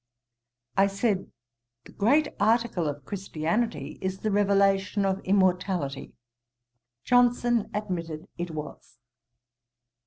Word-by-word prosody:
"' 120 +3 -41
I - - +4
said, 200 -1 -1 0.5
the - - -13
great 285 +9 +3
article 220 -5 +2
of 145 -2 -5
Christianity 165 - -2
is 190 0 -3
the 215 - 0
revelation 200 0 +2
of 190 0 0
immortality. 185 -7 0 0.9
Johnson 245 -2 +3
admitted 170 -7 -4
it 175 0 -4
was. 150 -2 -8
195 Hz, 100 wpm, -27 LUFS, 165-210 Hz, 0.9 s, I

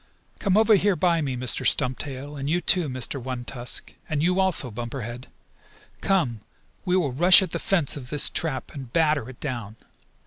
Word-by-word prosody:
"Come 195 -1 +1
over 220 0 +5
here 200 -1 +3
by 170 -2 +1
me, 135 -4 -3
Mr. 125 0 -1
Stumptail, 135 +2 0
and 140 0 -4
you 170 +3 +2
too, 180 -3 +2
Mr. 130 +1 -3
One 125 -1 -5
Tusk, 125 -1 -4 0.2
and 150 -2 -1
you 180 +2 +2
also, 185 -9 +1
Bumper 120 +4 -6
Head. 120 +3 -7 0.7
Come, 155 - 0 0.4
we 180 0 +2
will 155 -7 0
rush 175 +8 +7
at 180 - -5
the - - -3
fence 170 -8 +1
of 130 -4 -8
this 145 0 +4
trap 155 -6 -2
and 135 -5 -9
batter 150 -6 +1
it 130 - -12
down. 120 -7 -5
145 Hz, 185 wpm, -24 LUFS, 125-175 Hz, 0.7 s, rush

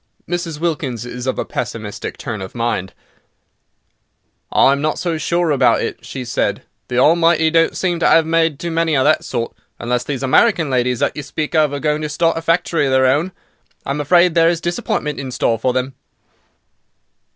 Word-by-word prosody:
Mrs. 170 -3 -3
Wilkins 145 -8 -2
is 125 +1 -6
of 130 - -1
a - - -2
pessimistic - - -5
turn 110 -4 -5
of 95 +4 -8
mind. 115 -5 -2 1.6
"I - - +5
am 140 0 0
not 155 +1 -1
so 170 -3 -2
sure 170 +1 0
about 140 - +3
it," - - -5
she 130 - -6
said; 120 - -1 0.2
"the 125 - -3
Almighty 160 +3 +4
don't 165 0 +2
seem 175 -2 -1
to 170 - +2
'ave 160 -1 +4
made 165 -2 +1
too 170 +2 -4
many 165 -1 +1
of 130 - +3
that - - +3
sort. 115 -2 -3 0.2
Unless 125 +1 -2
these 135 -2 -4
American 160 - +3
ladies 125 -1 +1
that - - 0
you 150 - -4
speak 150 +2 -4
of 155 -3 +3
are 145 - -3
going 150 +1 0
to 150 - -3
start 165 +2 +1
a 165 - -3
factory 165 -2 +1
of - - -1
their 130 0 +4
own. 145 +8 +2 0.5
I - - -2
am 145 +1 -2
afraid 175 +3 +4
there 165 0 +4
is 170 -1 0
disappointment 170 -3 -2
in 135 -1 -5
store 115 -2 0
for 130 +2 +1
them." 130 +1 -2
150 Hz, 195 wpm, -18 LUFS, 130-165 Hz, 1.6 s, I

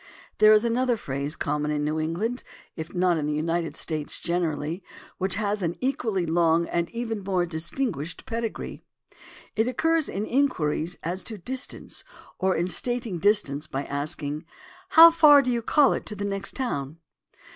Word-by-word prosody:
There 215 0 +7
is 215 +2 +5
another 240 +1 +1
phrase 140 -3 -3
common 150 +1 -2
in 150 -1 -1
New 155 +1 -1
England, 190 +11 -2 0.3
if 160 0 -6
not 175 -2 +2
in 150 - -2
the 150 - -1
United 165 +2 -1
States 155 -2 -2
generally, 170 0 -2 0.4
which 185 -1 +1
has 205 0 -1
an 170 -1 -1
equally 230 -8 -1
long 165 0 +2
and 170 0 -1
even 230 -3 -4
more 185 -2 0
distinguished 170 - -3
pedigree. 230 -3 -4 0.7
It 220 +2 +1
occurs 320 +5 +1
in 205 +2 -3
inquiries 180 - 0
as 180 +3 -3
to 220 - -3
distance 255 +8 -3 0.4
or 190 0 +2
in 170 +2 0
stating 230 +1 -1
dis 205 +3 +4
tance 145 +2 -5
by 140 -2 -3
asking: 145 +1 -3 0.5
"How 330 +1 +10
far 295 -4 +7
do 250 - 0
you 235 -1 0
call 275 +4 +4
it - - -4
to 210 - -4
the 205 0 -4
next 195 0 -3
town?" 155 - -3
185 Hz, 165 wpm, -25 LUFS, 160-230 Hz, 0.7 s, How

